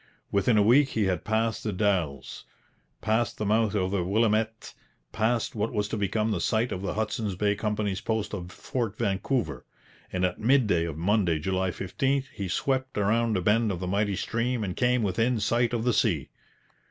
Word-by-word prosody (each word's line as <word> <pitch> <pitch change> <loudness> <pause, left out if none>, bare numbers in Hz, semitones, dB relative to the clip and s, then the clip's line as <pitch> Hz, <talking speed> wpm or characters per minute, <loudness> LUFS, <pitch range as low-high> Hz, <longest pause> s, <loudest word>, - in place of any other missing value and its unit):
Within 105 +3 +3
a 105 - +5
week 135 +6 +5
he 110 - 0
had 95 -3 0
passed 110 0 0
the 110 - -1
Dalles, 90 -9 -1 0.6
passed 110 +1 0
the 105 - -2
mouth 110 +1 +2
of 95 -2 0
the 100 -3 0
Willamette, 110 +3 0 0.4
passed 115 +1 0
what 110 0 -1
was 105 -1 -1
to - - -2
become 105 +2 0
the 90 -5 -1
site 115 +6 +1
of 90 - -3
the 100 - -3
Hudson's 110 -2 -2
Bay 100 +2 +1
Company's 105 -2 -2
post 110 -2 -2
of 90 -3 -5
Fort 115 -1 -4
Vancouver; 95 - -1 0.5
and 90 0 0
at 90 - -2
midday 110 -9 +3
of 80 -3 -5
Monday, 90 -1 +2
July 95 +4 -1
15, 130 +10 -1
he 100 -8 -4
swept 130 +7 -1
round 110 +1 +2
a - - -1
bend 110 +2 +3
of 90 - -3
the 90 - -3
mighty 100 +2 0
stream 115 +3 -1
and 90 -3 -3
came 125 -1 +2
within 115 +5 +1
sight 120 +3 +1
of 120 -2 -1
the 125 0 +2
sea. 90 - +1
105 Hz, 190 wpm, -27 LUFS, 95-115 Hz, 0.6 s, a